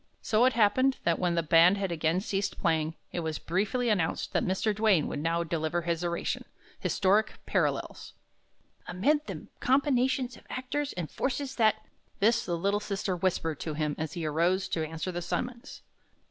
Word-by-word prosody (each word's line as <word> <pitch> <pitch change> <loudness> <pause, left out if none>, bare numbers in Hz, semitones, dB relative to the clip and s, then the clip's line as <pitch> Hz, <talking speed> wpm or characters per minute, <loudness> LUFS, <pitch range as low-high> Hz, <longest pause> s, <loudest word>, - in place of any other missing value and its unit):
So 220 +3 +3
it 260 - +4
happened 240 +5 +3
that 170 -1 +1
when 175 -2 +1
the 170 - +1
band 165 +4 +6
had 195 -2 -2
again 165 +2 +1
ceased 200 -1 -2
playing, 160 0 +1 0.2
it - - -3
was 160 -2 -2
briefly 205 +8 -1
announced 195 -8 0
that - - +2
Mr. 195 +3 0
Duane 205 -7 +3
would - - -4
now 165 +2 0
deliver 165 +1 -1
his 170 0 -1
oration, 170 0 -2 0.4
"Historic 205 +3 +1
Parallels." - - -1 0.7
"'Amid 295 - +1
the - - -6
combinations 260 -1 +2
of - - -17
actors 280 +3 -3
and 170 -3 -5
forces 270 +1 -2
that 215 -2 +2 0.2
'" - - -39
This 230 +3 +3
the 175 -1 -1
little 200 +4 +1
sister 195 -2 -2
whispered 170 -4 -1
to 155 -2 -4
him 150 -1 -1
as 160 -1 -3
he 170 -3 -4
arose 175 +5 +1
to 160 - -1
answer 160 +3 -4
the 175 0 -4
summons. 240 +7 -4
185 Hz, 175 wpm, -29 LUFS, 165-225 Hz, 0.7 s, band